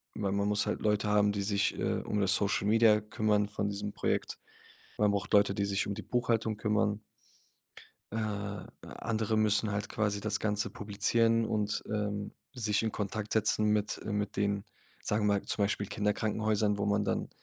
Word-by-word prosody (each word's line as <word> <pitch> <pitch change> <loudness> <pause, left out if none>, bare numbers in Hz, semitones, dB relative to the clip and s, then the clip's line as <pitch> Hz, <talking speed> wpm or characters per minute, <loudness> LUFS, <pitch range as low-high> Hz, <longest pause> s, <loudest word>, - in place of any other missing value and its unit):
weil 100 - -1
man 100 +1 0
muss 105 0 +2
halt - - -2
Leute 105 -1 +1
haben, 105 0 +4
die 100 -1 -2
sich, 100 0 0
äh, - - -1
um 105 - -2
das 95 0 +3
Social 100 -1 0
Media 110 -1 +5
kümmern 105 -1 +1
von 105 -1 -2
diesem 100 0 -4
Projekt. - - -1 0.6
Man 105 -1 +3
braucht 100 0 -2
Leute, 100 -1 +5
die 100 -1 0
sich 100 -1 0
um 100 - -3
die 110 - -6
Buchhaltung 115 -3 0
kümmern. 105 -1 0 1.1
Äh, 110 - -2 0.7
andere 110 -1 -2
müssen 105 0 +3
halt 100 0 -3
quasi 105 -1 -1
das 105 -1 -1
Ganze 105 -1 -1
publizieren 115 +3 +1
und, 105 -1 -1
ähm, 105 -1 -2 0.2
sich 105 -3 0
in 110 - 0
Kontakt 105 +1 -3
setzen 110 0 +2
mit 105 0 +1
mit 105 -2 -2
den, 100 0 0 0.4
sagen 105 0 0
wir 100 - +4
mal, 100 - -1
zum 105 - 0
Beispiel 100 0 -2
Kinderkrankenhäusern, 105 0 0
wo 100 - -1
man 105 0 +2
dann 100 - -2
105 Hz, 180 wpm, -31 LUFS, 100-110 Hz, 1.1 s, Media